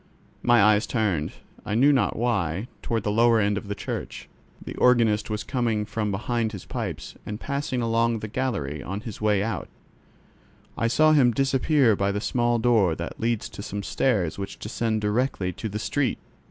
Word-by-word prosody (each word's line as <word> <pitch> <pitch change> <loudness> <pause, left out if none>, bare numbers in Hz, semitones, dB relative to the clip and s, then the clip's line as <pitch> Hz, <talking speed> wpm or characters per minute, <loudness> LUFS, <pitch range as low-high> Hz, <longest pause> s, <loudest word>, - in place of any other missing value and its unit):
My 120 -3 +5
eyes 105 +1 +4
turned, 100 - 0 0.3
I 105 - -3
knew 140 +5 +5
not 135 - +1
why, 100 -4 -1
toward 115 -3 -2
the 105 - 0
lower 115 +1 +4
end 105 -1 +2
of 105 0 -5
the 100 - -3
church. - - -6 0.3
The - - -8
organist 115 -4 +3
was 105 -1 -2
coming 115 -3 -1
from 105 0 -2
behind 110 +3 -1
his 100 - -8
pipes, - - -5
and 105 0 -6
passing 140 -3 -2
along 115 0 +1
the 110 - -5
gallery 100 - -2
on 95 +8 -5
his 110 -3 -8
way 105 -2 +2
out, 105 -5 -3 1.1
I 115 - 0
saw 155 +6 +4
him 140 -5 +5
disappear 135 -1 +3
by 100 0 0
a 100 +1 -1
small 120 +2 +1
door 110 -8 +3
that 85 +1 -6
leads 115 -1 -1
to - - -9
some 100 0 -5
stairs 100 -8 0
which 100 - -5
descend 110 0 -2
directly 105 -3 0
to 110 - -5
the 105 - -4
street. 135 +4 -1
110 Hz, 180 wpm, -25 LUFS, 100-120 Hz, 1.1 s, My